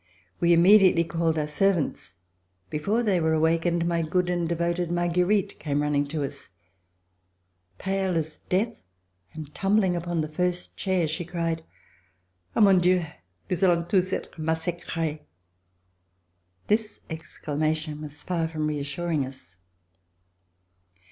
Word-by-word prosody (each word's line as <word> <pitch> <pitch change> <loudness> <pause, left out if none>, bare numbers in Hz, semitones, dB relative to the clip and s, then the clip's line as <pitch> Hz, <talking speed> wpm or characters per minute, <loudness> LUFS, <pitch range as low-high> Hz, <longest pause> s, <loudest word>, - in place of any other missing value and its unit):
We 170 0 +3
immediately 180 0 +6
called 165 -1 0
our 150 - +1
servants. 150 - 0 0.6
Before 200 +10 0
they 200 -5 +2
were 160 -1 +2
awakened, 165 +2 +2
my 170 -1 +1
good 180 +3 0
and 175 -2 -1
devoted 170 0 0
Marguerite 175 +3 +1
came 145 -1 -1
running 145 -1 +1
to 150 0 -3
us, 135 - -7 1.3
pale 190 - -1
as 155 -1 -3
death, 220 +6 0 0.5
and 155 -2 -8
tumbling 195 -2 +2
upon 170 -1 -1
the 155 - -2
first 180 +3 -2
chair, 185 -4 0
she 160 +3 -2
cried: 165 -1 -2 0.9
*'Ah! - - +3
mon 195 -3 +7
Dieu! 180 0 +3 0.4
nous 180 - -2
allons 170 -3 +3
tous 185 0 +2
etre 175 - -4
massacres." 160 -1 -2 1.5
This 215 0 0
exclamation 155 -1 -3
was 150 -1 -9
far 170 -3 -1
from 155 -1 -3
reassuring 150 +1 -1
us. 130 -10 -11
170 Hz, 125 wpm, -26 LUFS, 155-180 Hz, 1.5 s, mon